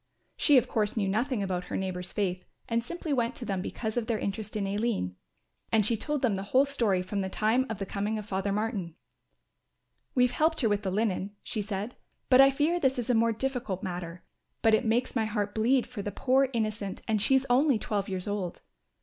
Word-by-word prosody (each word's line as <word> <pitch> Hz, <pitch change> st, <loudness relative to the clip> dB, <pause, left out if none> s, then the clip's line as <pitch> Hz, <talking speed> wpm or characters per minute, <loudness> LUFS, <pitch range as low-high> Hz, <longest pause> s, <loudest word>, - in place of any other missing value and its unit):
She 290 Hz, -3 st, +5 dB
of 250 Hz, -, +3 dB
course 215 Hz, 0 st, 0 dB
knew 200 Hz, -3 st, +1 dB
nothing 225 Hz, +3 st, 0 dB
about 180 Hz, -2 st, -2 dB
her -, -, -3 dB
neighbour's 180 Hz, -2 st, -3 dB
faith 185 Hz, -3 st, -1 dB, 0.2 s
and 230 Hz, 0 st, 0 dB
simply 325 Hz, +2 st, -4 dB
went 240 Hz, -2 st, 0 dB
to 245 Hz, -, -6 dB
them 195 Hz, -3 st, -2 dB
because 220 Hz, +4 st, -4 dB
of 230 Hz, -2 st, -1 dB
their 230 Hz, -, +1 dB
interest 210 Hz, +1 st, -4 dB
in 205 Hz, -2 st, -1 dB
Aline; 200 Hz, -, -1 dB, 0.6 s
and 220 Hz, -2 st, +4 dB
she 230 Hz, -, +3 dB
told 295 Hz, +5 st, -3 dB
them 235 Hz, -5 st, +3 dB
the 195 Hz, -, -2 dB
whole 255 Hz, +8 st, +3 dB
story 225 Hz, -10 st, +1 dB
from 200 Hz, +2 st, -2 dB
the 190 Hz, -, -2 dB
time 225 Hz, +7 st, +1 dB
of 225 Hz, -, -3 dB
the 195 Hz, -, -3 dB
coming 205 Hz, +3 st, -2 dB
of 210 Hz, -, -5 dB
Father 195 Hz, -1 st, -1 dB
Martin. 200 Hz, -5 st, -2 dB, 1.2 s
"We 250 Hz, -1 st, +5 dB
helped 315 Hz, +5 st, +1 dB
her 225 Hz, -, +3 dB
with 205 Hz, -1 st, +1 dB
the 195 Hz, -, -2 dB
linen," 200 Hz, 0 st, -1 dB
she 215 Hz, -, -2 dB
said, 205 Hz, +3 st, -4 dB, 0.4 s
"but 255 Hz, +1 st, +9 dB
I 270 Hz, -, +8 dB
fear 300 Hz, +6 st, +1 dB
this 265 Hz, -4 st, +2 dB
is 245 Hz, 0 st, 0 dB
a -, -, +3 dB
more 230 Hz, 0 st, +3 dB
difficult 230 Hz, -5 st, -3 dB
matter; 175 Hz, -2 st, -5 dB, 0.4 s
but 225 Hz, -, +5 dB
it 220 Hz, +3 st, +3 dB
makes 235 Hz, +4 st, +1 dB
my 225 Hz, -2 st, +2 dB
heart 210 Hz, -2 st, -2 dB
bleed 240 Hz, +4 st, +2 dB
for 235 Hz, -4 st, -6 dB
the 205 Hz, -, -4 dB
poor 265 Hz, +5 st, +2 dB
innocent 215 Hz, -4 st, -3 dB
and 215 Hz, -2 st, +1 dB
she 265 Hz, +5 st, +5 dB
only 265 Hz, +1 st, +4 dB
twelve 205 Hz, -2 st, -2 dB
years 185 Hz, 0 st, -3 dB
old. 200 Hz, -4 st, -3 dB
215 Hz, 220 wpm, -29 LUFS, 195-245 Hz, 1.2 s, but